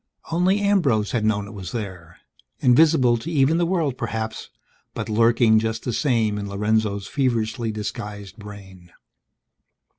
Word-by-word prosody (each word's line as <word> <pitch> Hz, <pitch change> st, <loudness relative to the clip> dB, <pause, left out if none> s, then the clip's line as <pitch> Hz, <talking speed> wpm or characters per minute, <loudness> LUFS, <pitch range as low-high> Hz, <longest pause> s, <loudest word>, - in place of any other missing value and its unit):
Only 185 Hz, +4 st, +2 dB
Ambrose 150 Hz, -, +2 dB
had 115 Hz, -3 st, -1 dB
known 105 Hz, -2 st, 0 dB
it 100 Hz, -, -11 dB
was 95 Hz, -4 st, -8 dB
there. 90 Hz, -7 st, -7 dB, 0.4 s
Invisible 130 Hz, -2 st, +4 dB
to 135 Hz, +8 st, -7 dB
even 155 Hz, 0 st, +2 dB
the 170 Hz, -, +1 dB
world, 160 Hz, -8 st, -1 dB
perhaps; 110 Hz, -1 st, -4 dB, 0.5 s
but 115 Hz, -1 st, -4 dB
lurking 115 Hz, 0 st, +4 dB
just 110 Hz, 0 st, -3 dB
the 125 Hz, -, -3 dB
same 110 Hz, -6 st, +1 dB
in 100 Hz, 0 st, -5 dB
Lorenzo's 105 Hz, 0 st, 0 dB
feverishly 115 Hz, -3 st, -1 dB
disguised 105 Hz, -1 st, -6 dB
brain. 95 Hz, -4 st, -12 dB
110 Hz, 140 wpm, -23 LUFS, 105-130 Hz, 0.5 s, Invisible